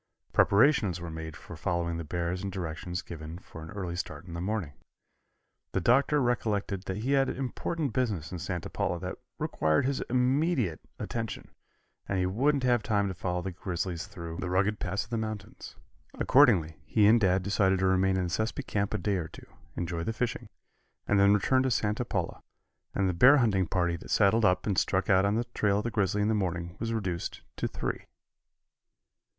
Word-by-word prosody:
Preparations 105 - +4
were 85 -1 -6
made 80 -1 -6
for 85 - -10
following 85 0 -1
the 85 - -4
bears 85 +3 -2
and 100 -1 -3
directions 90 -1 -4
given 80 0 -8
for 80 -3 -11
an 80 - -9
early 95 -4 -4
start 85 -1 -5
in 85 - -9
the 85 - -4
morning. 95 -5 -2 1.0
The - - +2
Doctor 135 - +3
recollected 105 -6 -1
that 95 0 -3
he 120 +6 -2
had 135 -1 +3
important 135 +2 -3
business 105 - -1
in 90 - -5
Santa 90 0 -4
Paula - - -2
that - - -5 0.2
required 80 +7 +1
his 135 0 0
immediate 125 - +1 0.2
attention, 115 -2 -5 0.6
and 100 - 0
he 90 - +1
wouldn't 135 +9 +1
have 120 -2 +3
time 100 -2 +1
to - - -3
follow 90 0 -2
the 95 - -3
grizzlies 90 -1 -4
through 85 -1 -7
the 90 0 -3
rugged 100 +4 +1
passes 95 +3 -1
of 120 - -23
the 115 - 0
mountains. 110 -3 -6 0.4
Accordingly, 100 - +4
he 105 +8 +3
and 115 +2 +6
Dad 95 -1 +3
decided 95 -1 +2
to 95 - 0
remain 95 0 +3
in 95 - 0
the 90 - -2
Sespe 110 +5 -2
camp 100 -1 -1
a - - +1
day 100 -2 0
or 80 -3 -3
two, - - -13 0.3
enjoy 85 -1 -3
the 115 - -2
fishing, 120 +1 -3 0.6
and 100 - +3
then 100 +1 +6
return 130 +6 +3
to 130 - +1
Santa 105 -1 0
Paula, 90 -7 -3 0.5
and 100 - +2
the 90 - +1
bear 125 +12 +7
hunting 100 - +2
party 85 -1 0
that - - -12
saddled 105 +2 +4
up 90 -1 +2
and 100 -4 +2
struck 95 +1 +1
out 95 +1 +5
on 100 +1 +2
the 115 - +1
trail 100 -1 +2
of 105 - -1
the 120 - -2
grizzly 105 -1 +1
in - - +1
the 110 - +2
morning 85 -4 -2
was 115 0 -2
reduced 95 -6 -3
to - - -1
three. - - -4
95 Hz, 200 wpm, -29 LUFS, 90-110 Hz, 1.0 s, bear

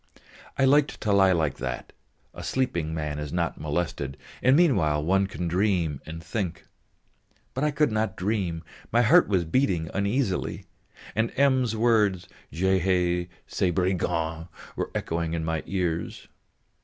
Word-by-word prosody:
I 135 - +4
liked 145 +2 +3
to 105 - +1
lie 95 -1 +5
like 80 -5 +1
that; 65 -2 -5 0.4
a - - -8
sleeping 85 -12 -1
man 75 -2 -3
is 75 -1 -5
not 85 -3 -2
molested, 75 -3 -2 0.2
and 130 +2 +5
meanwhile 80 - +3
one 95 +3 +2
can 90 -2 -4
dream 90 -5 0
and 80 +1 -7
think. 85 -1 -4 0.9
But 130 - -2
I 150 - +3
could 150 -3 +1
not 110 -3 -1
dream, 90 -4 -1 0.3
my 120 +2 +4
heart 170 +9 +6
was 95 -4 +1
beating 85 -5 +1
uneasily, 100 0 -1 0.5
and 115 +1 0
M.'s 130 -4 +3
words, 105 -6 +2 0.2
"Je 95 +4 +2
haïs 90 -1 +1 0.2
ces 95 - 0
brigands!" 80 -2 -1 0.3
were - - -2
echoing 85 0 -2
in 80 -1 -2
my 80 -1 -1
ears. 85 -3 -2
90 Hz, 145 wpm, -26 LUFS, 80-110 Hz, 0.9 s, heart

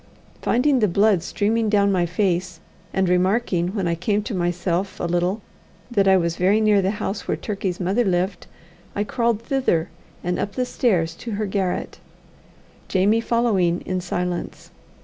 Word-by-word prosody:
Finding 260 +3 +2
the 215 - +3
blood 200 0 +3
streaming 220 +4 0
down 200 -1 +3
my 180 -2 +1
face, 180 -1 -1 0.3
and 190 -1 +1
remarking 180 0 +1
when 195 -4 0
I 170 - +1
came 205 +5 0
to 215 - -5
myself 175 +1 -1
a - - -4
little 175 +4 0 0.5
that 200 -4 +2
I 190 0 +6
was 170 -2 -1
very 195 +4 +3
near 210 -2 +4
the 190 - +1
house 200 +1 -4
where - - 0
Turkey's 195 -4 -3
mother 195 +6 +1
lived, 185 -1 -1 0.5
I 205 - +1
crawled 230 0 0
thither, 230 -12 0 0.3
and 180 +1 -1
up 200 - -2
the 255 - 0
stairs 180 -11 +1
to 230 - -6
her 210 +1 -1
garret, 190 -2 -2 0.9
Jamie 205 +4 +2
following 205 -8 +1
in 185 0 -3
silence. 180 0 -4
195 Hz, 165 wpm, -22 LUFS, 180-215 Hz, 0.9 s, I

